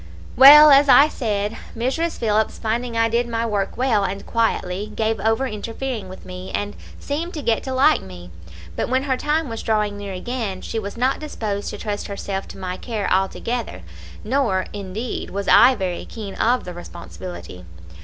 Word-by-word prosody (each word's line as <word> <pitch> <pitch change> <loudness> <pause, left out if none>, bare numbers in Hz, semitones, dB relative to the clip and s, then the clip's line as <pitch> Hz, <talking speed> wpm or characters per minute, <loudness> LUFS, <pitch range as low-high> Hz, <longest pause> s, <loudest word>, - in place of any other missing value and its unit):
"Well, 295 +3 +10
as 280 +1 +6
I 280 +2 +8
said, 210 -5 -2 0.2
Mrs. 295 +8 -1
Phillips, 215 -1 0
finding 230 +1 -2
I 230 0 +3
did 235 +1 0
my 230 0 -1
work 205 -3 -2
well 245 -6 +2
and 195 0 -4
quietly, 210 -3 -1
gave 220 -1 0
over 225 +6 +1
interfering 225 -1 -5
with 185 - -11
me, 185 0 -8
and 205 0 -3 0.2
seemed 325 +5 -4
to 300 - -5
get 230 -2 +1
to 265 - -4
like 265 +4 +4
me; 90 -1 -11 0.4
but - - -2
when 260 +1 +1
her 270 -2 0
time 300 +4 -1
was 225 -2 -5
drawing 210 -2 -1
near 200 -1 -6
again, 210 -2 -4
she 225 - -4
was 205 +1 -7
not 255 +3 +1
disposed 210 -9 -4
to - - -6
trust 205 -1 -4
herself 195 -1 -4
to - - -11
my 185 -1 -5
care 220 -6 -2
altogether, 195 - -2 0.4
nor, 230 -6 0
indeed, 205 +4 -5
was 200 +1 -4
I 255 +2 +7
very 185 -4 -3
keen 210 -4 -8
of 245 +3 +1
the 180 - -7
responsibility. 175 - -9
220 Hz, 180 wpm, -21 LUFS, 195-255 Hz, 0.4 s, Well